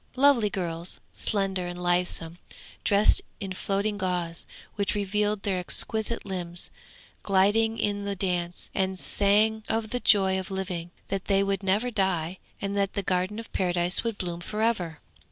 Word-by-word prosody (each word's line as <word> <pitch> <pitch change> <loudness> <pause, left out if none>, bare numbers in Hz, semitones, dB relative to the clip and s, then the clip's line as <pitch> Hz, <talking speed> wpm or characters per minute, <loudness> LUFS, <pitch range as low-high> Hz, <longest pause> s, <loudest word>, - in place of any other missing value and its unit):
Lovely 260 -5 +5
girls, 175 -2 -2
slender 195 -3 -1
and 175 0 -6
lissom, 175 -1 0 0.4
dressed 205 +1 +4 0.2
in 195 -3 -4
floating 200 +2 -1
gauze, 175 -3 -1 0.3
which 200 -1 -1
revealed 205 0 0
their 190 -3 0
exquisite 220 +5 0
limbs, 175 -3 -5 0.5
glided 210 +3 +3
in 205 -1 0
the 200 0 -2
dance, 180 -2 -2
and 190 -1 0
sang 210 +3 +3
of 220 -1 0
the 245 - 0
joy 190 -4 +4
of 190 - -6
living 185 -3 -3 0.2
that 195 0 -2
they 195 -1 +3
would 195 -1 0
never 205 +6 +1
die 185 -4 0 0.2
and 200 0 -2
that 200 -1 +1
the 200 - -2
Garden 185 +3 0
of 230 - -8
Paradise 180 -1 +2
would 230 -3 -2
bloom 175 -2 -3
for 215 +4 -2
ever. 180 -9 0
195 Hz, 155 wpm, -27 LUFS, 180-210 Hz, 0.5 s, Lovely